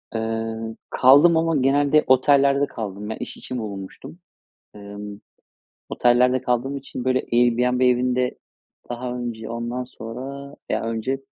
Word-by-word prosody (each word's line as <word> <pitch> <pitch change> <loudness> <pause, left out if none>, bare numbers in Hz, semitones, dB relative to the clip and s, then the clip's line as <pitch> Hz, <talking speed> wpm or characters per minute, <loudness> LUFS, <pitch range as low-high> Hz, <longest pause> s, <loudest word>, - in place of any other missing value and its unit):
Iıı, 115 0 -3
kaldım 145 +6 +6
ama 165 0 +1
genelde 140 +3 +3
otellerde 140 +2 +4
kaldım. 105 -1 -6
Ben 110 - -3
iş - - -7
için 125 - -6
bulunmuştum. 105 - -8 0.6
Imm, 100 0 -9 0.7
otellerde 125 +1 +3
kaldığım 130 +2 -1
için, 135 -2 -7
böyle, 130 0 +2
Airbnb 125 +1 +3
evinde 125 0 +1 0.5
daha 125 +1 -4
önce, 115 -2 -5
ondan 120 +2 -4
sonra 135 +5 -8
ya, - - -1
önce 115 +4 -2
125 Hz, 120 wpm, -22 LUFS, 115-135 Hz, 0.7 s, kaldım